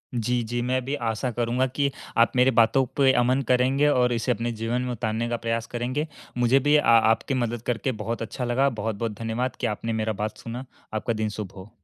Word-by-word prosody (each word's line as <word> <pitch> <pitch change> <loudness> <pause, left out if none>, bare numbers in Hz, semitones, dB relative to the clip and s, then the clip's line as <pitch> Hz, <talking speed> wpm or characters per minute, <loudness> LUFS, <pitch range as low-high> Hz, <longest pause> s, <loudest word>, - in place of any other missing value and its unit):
जी, 120 +1 0
जी। 120 +2 -2
मैं 130 +1 0
भी 140 +2 -1
आशा 115 +3 -2
करूँगा 120 +2 0
कि 140 +2 0 0.3
आप 115 0 +5
मेरी 125 +1 +5
बातों 115 +4 +4
पे 135 -2 +5
अमन 125 +2 +2
करेंगे 130 +3 +3
और 125 -3 +3
इसे 115 -1 0
अपने 115 +3 -1
जीवन 115 +2 -2
में 125 0 -3
उतारने 115 0 -2
का 120 - -1
प्रयास 115 0 -2
करेंगे। 130 +6 -1 0.3
मुझे 120 +2 +4
भी 145 +2 +3
अ, 150 - +4
आपकी 115 +3 +4
मदद 120 -3 -1
करके 125 +2 -1
बहुत 115 +2 -3
अच्छा 115 +3 -4
लगा। 130 +3 +2
बहुत-बहुत 110 -1 -3
धन्यवाद 115 +3 -2
कि - - 0
आपने 115 +2 -3
मेरा 110 0 -1
बात 110 0 -4
सुना। 120 +3 -7 0.3
आपका 110 +2 -1
दिन 110 -1 -1
शुभ 100 -3 -5
हो। 95 +2 -10
120 Hz, 215 wpm, -25 LUFS, 115-130 Hz, 0.3 s, आप